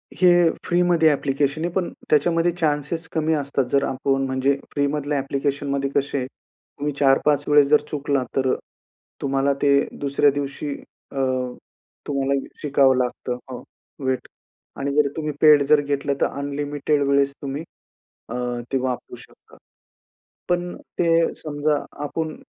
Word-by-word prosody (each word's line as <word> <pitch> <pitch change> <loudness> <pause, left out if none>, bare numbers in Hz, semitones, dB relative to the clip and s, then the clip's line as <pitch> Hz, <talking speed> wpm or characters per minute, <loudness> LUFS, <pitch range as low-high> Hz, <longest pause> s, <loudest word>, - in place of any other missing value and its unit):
हे 180 -1 +5 0.3
फ्रीमध्ये 175 -2 +3
ॲप्लिकेशन 140 +1 0
आहे, - - 0
पण 185 -2 0 0.2
त्याच्यामध्ये 165 +3 +3
चान्सेस 160 0 -1
कमी 160 0 +1
असतात 140 -2 -1
जर 140 0 +3
आपण 135 0 0
म्हणजे 130 +1 +1 0.2
फ्रीमधल्या 145 0 0
ॲप्लिकेशनमध्ये 140 0 -1
कसे 140 -2 0
तुम्ही 145 +1 -8
4-5 145 +1 +3
वेळेस 145 -1 +5
जर 150 0 +5
चुकला 140 -2 0
तर 130 -1 +2 0.7
तुम्हाला 135 0 +1
ते 140 -1 +4 0.3
दुसऱ्या 140 +1 +3
दिवशी 145 +1 -4 0.4
अ, - - -12 0.9
तुम्हाला 140 -1 0 0.3
शिकावं 135 -2 +4
लागतं 125 0 -2
हो, 125 - -6 0.4
वेट 130 -1 -1 0.5
आणि 140 +1 -1
जर 150 -1 +4
तुम्ही 155 -1 -2
पेड 150 -2 +7
जर 150 -1 +6
घेतलं 140 0 -1
तर - - +5
अनलिमिटेड 145 +1 -2
वेळेस 140 0 +3
तुम्ही 140 +3 -4 0.7
अ, 120 - -4 0.4
ते 135 - +2
वापरू 130 -1 -3
शकता. - - -17 0.9
पण 175 0 -1 0.2
ते 165 -1 +3
समजा 150 0 -1 0.3
आपण 155 +1 -3
145 Hz, 130 wpm, -23 LUFS, 140-150 Hz, 0.9 s, पेड